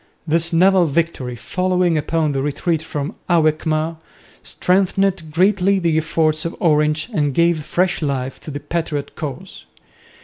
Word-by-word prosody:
This 165 +2 +1
naval 180 +1 +4
victory, 140 -5 -1
following 180 +5 0
upon 155 0 0
the 135 -1 -1
retreat 150 +3 -1
from 150 -2 -4 0.2
Alkmaar, 155 -1 +1 0.4
strengthened 190 -2 0
greatly 195 +3 +3
the 170 -4 +1
efforts 155 0 +1
of 165 - -4
Orange 150 -1 +2
and 145 -7 0
gave 170 -2 +2
fresh 180 +3 0
life 135 -3 -2
to - - -10
the 145 -1 -5
patriot 155 -3 -4
cause. 155 +5 -7
160 Hz, 135 wpm, -19 LUFS, 150-175 Hz, 0.4 s, naval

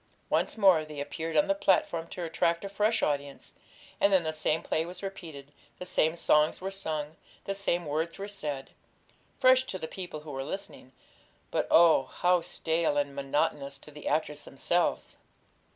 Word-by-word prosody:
Once - - +1
more 190 -7 +5
they 155 -1 -8
appeared 160 +3 -3
on 150 - +5
the 195 - +3
platform 170 -4 +1
to 180 - -6
attract 170 +2 0
a - - -4
fresh 210 +3 +1
audience, 140 -1 -2 0.5
and 200 - +4
then 190 -3 +4
the 160 -1 -2
same 155 0 0
play 160 - 0
was 180 +3 -9
repeated, 160 -8 -8 0.3
the 180 - -7
same 165 -3 +1
songs 155 -2 +3
were 190 +1 -4
sung, 155 -5 -4 0.3
the 195 - -1
same 175 -3 -1
words 155 +3 -2
were 200 - -5
said; 150 -9 -5 0.7
fresh 255 0 +5
to 190 - -4
the 160 - -5
people 175 -5 -7
who 150 -1 -9
were 135 -1 -4
listening, 155 -4 -7 0.6
but - - 0
oh, 165 -5 +6
how 180 0 +2
stale 160 -2 0
and 145 -1 0
monotonous 140 0 -1
to 150 - -14
the 150 0 -9
actors 150 0 -1
themselves! 170 +5 -1
160 Hz, 175 wpm, -29 LUFS, 150-185 Hz, 0.7 s, oh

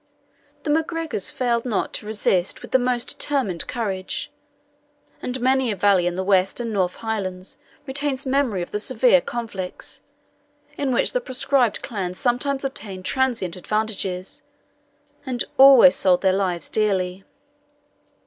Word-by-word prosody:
The 300 - -1
MacGregors 320 - +1
failed 235 -2 0
not 230 -6 -2
to 210 - -6
resist 195 -4 0
with - - -10
the 260 - +4
most 245 -1 -1
determined 250 -12 -1
courage; 200 -6 -4 0.9
and 250 +1 -4
many 260 0 +2
a - - -2
valley 190 -2 +3
in 175 - -2
the 190 - -2
West 190 +1 +2
and 230 -2 -3
North 185 -3 0
Highlands 200 +1 -5 0.3
retains 275 0 -2
memory 260 -9 0
of - - -10
the 210 - -2
severe - - +3
conflicts, 225 - -6 0.7
in 280 -2 -1
which 245 - +2
the - - -1
proscribed 255 - +1
clan 185 -5 -4
sometimes 265 +5 0
obtained 200 -8 -6
transient 240 -10 0
advantages, 195 -2 -3 0.8
and 255 -3 -2 0.2
always 270 0 +8
sold 180 -2 +3
their 190 -1 +4
lives 185 -3 -1
dearly. 190 -3 -1
225 Hz, 140 wpm, -22 LUFS, 190-265 Hz, 0.9 s, always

